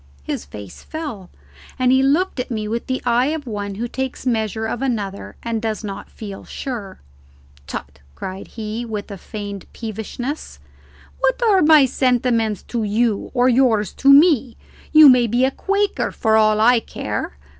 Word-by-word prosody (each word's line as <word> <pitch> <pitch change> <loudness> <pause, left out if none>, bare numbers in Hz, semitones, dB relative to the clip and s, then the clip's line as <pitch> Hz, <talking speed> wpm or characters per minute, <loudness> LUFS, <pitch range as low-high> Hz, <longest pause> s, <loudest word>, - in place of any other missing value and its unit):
His 70 - -4
face 100 +6 -10
fell, 285 - -7 0.5
and 255 -1 +3
he 260 0 +4
looked 290 +4 +1
at 250 - -3
me 215 -3 -3
with 230 +2 -3
the 260 -1 -2
eye 245 +2 +3
of 310 -1 -3
one 205 -4 -4
who 235 +4 -3
takes 265 +1 -5
measure 220 -2 -1
of 220 +2 -3
another 210 -7 -3
and 230 -2 -2
does 220 -1 -3
not 200 -2 -6
feel 200 -3 -9
sure. 225 -8 -6 0.7
"Tut!" 70 +1 -7 0.2
cried 190 - -7
he, 220 +1 -5
with 215 -3 -5
a 200 - -6
feigned 205 -2 -7
peevishness; 230 +6 -5 0.6
"what - - +1
are 410 -5 +4
my 300 -2 +7
sentiments 240 -5 +1
to 235 - -3
you, 215 0 0
or 245 0 +4
yours 235 -6 +3
to 275 - +4
me? 280 -5 +5 0.3
you 310 -1 +9
may 250 -3 +6
be 240 +4 +2
a 265 - +1
Quaker 400 +6 -1
for 220 -1 +1
all 215 -1 +4
I 240 +2 +5
care. 70 - -5
235 Hz, 165 wpm, -20 LUFS, 210-265 Hz, 0.7 s, you